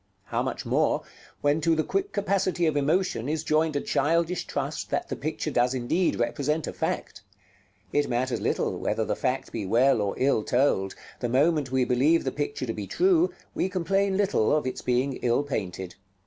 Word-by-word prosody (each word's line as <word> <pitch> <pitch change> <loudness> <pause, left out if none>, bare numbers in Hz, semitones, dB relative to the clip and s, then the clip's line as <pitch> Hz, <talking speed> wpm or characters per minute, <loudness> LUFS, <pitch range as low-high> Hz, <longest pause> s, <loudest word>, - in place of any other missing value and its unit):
How - - -2
much - - -3
more, - - +1 0.4
when 145 +2 +2
to 165 +1 +3
the 155 - +1
quick 390 - -1
capacity 195 -3 0
of 155 -2 +1
emotion 145 -3 +1
is 155 0 -1
joined 155 -1 +1
a 145 - +1
childish 165 +4 0
trust - - -3
that - - -2
the - - -2
picture - - -3
does 125 +2 +2
indeed 130 +9 +1
represent 145 +6 0
a - - -5
fact! - - -3 0.7
it 145 - +2
matters 125 +1 -1
little - - -1
whether - - -1
the - - -1
fact 130 +1 -2
be 115 - -3
well 115 +4 +3
or 100 -1 -1
ill 135 -4 +2
told; 105 -6 +1 0.2
the 120 - -2
moment 145 +1 +2
we 130 -1 +2
believe 135 +7 +3
the 130 - -1
picture 145 -2 -3
to 115 - -3
be 105 -3 -5
true, 360 -1 +3 0.2
we 190 - 0
complain 190 +2 +1
little 195 - +2
of 150 - -2
its 130 - -3
being 125 +2 0
ill 120 +3 +1
painted. 95 -9 -4
145 Hz, 190 wpm, -26 LUFS, 125-165 Hz, 0.7 s, to